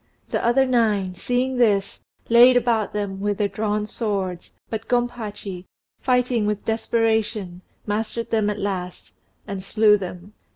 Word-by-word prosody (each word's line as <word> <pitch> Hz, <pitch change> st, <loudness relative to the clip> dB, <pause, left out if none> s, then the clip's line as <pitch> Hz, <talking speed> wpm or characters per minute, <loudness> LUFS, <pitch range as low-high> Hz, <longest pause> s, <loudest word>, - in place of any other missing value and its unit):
The -, -, -1 dB
other 250 Hz, +3 st, +4 dB
nine, 215 Hz, -7 st, +1 dB
seeing 250 Hz, +7 st, -1 dB
this, 200 Hz, -5 st, +2 dB, 0.3 s
laid 245 Hz, +2 st, +7 dB
about 230 Hz, -4 st, +1 dB
them 200 Hz, -2 st, -3 dB
with 205 Hz, 0 st, -1 dB
their 205 Hz, -, +1 dB
drawn 210 Hz, 0 st, -1 dB
swords, 195 Hz, -5 st, -3 dB, 0.2 s
but 220 Hz, 0 st, -5 dB
Gompachi, 215 Hz, -6 st, -3 dB, 0.3 s
fighting 250 Hz, -4 st, +1 dB
with 210 Hz, -1 st, -2 dB
desperation, 220 Hz, -4 st, 0 dB, 0.2 s
mastered 220 Hz, +2 st, -3 dB
them 215 Hz, -2 st, +2 dB
at 210 Hz, -, -2 dB
last, 185 Hz, -3 st, -4 dB, 0.3 s
and 195 Hz, -3 st, -5 dB
slew 210 Hz, +1 st, +4 dB
them. 185 Hz, +1 st, -8 dB
210 Hz, 135 wpm, -23 LUFS, 200-230 Hz, 0.3 s, laid